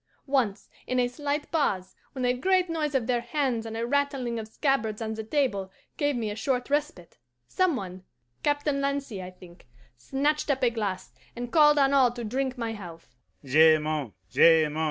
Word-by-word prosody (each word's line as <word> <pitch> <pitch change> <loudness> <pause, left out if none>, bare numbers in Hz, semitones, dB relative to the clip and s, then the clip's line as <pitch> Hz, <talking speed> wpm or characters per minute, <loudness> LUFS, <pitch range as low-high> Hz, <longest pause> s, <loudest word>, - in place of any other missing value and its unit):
Once, 260 -8 0 0.2
in 255 - 0
a 245 - +3
slight 290 +3 -3
pause, 190 - -1 0.2
when 260 -2 -2
a 245 - +3
great 365 +6 +1
noise 305 -3 -2
of 255 -4 +1
their 240 -1 0
hands 250 -4 -1
and 225 0 -5
a 230 - -1
rattling 270 -3 -1
of 220 - -6
scabbards 220 -3 -1
on 220 -1 -3
the 220 0 -5
table 215 -7 -1 0.2
gave 290 -1 0
me 220 -3 -2
a - - -5
short 250 +3 -2
respite, 290 - -2 0.3
some 370 -4 +1
one 185 -4 -6 0.4
Captain 290 -1 0
Lancy, 275 -7 -2
I 180 - -7
think 180 -5 -16 0.3
snatched 290 - -1
up 270 -2 0
a 240 - +4
glass, 205 -5 -4 0.2
and 240 0 -6
called 300 -2 +6
on 275 -1 +4
all 260 -3 +5
to 240 -1 -6
drink 260 +3 -2
my 230 -2 -3
health. 170 - -10
250 Hz, 175 wpm, -27 LUFS, 220-285 Hz, 0.4 s, called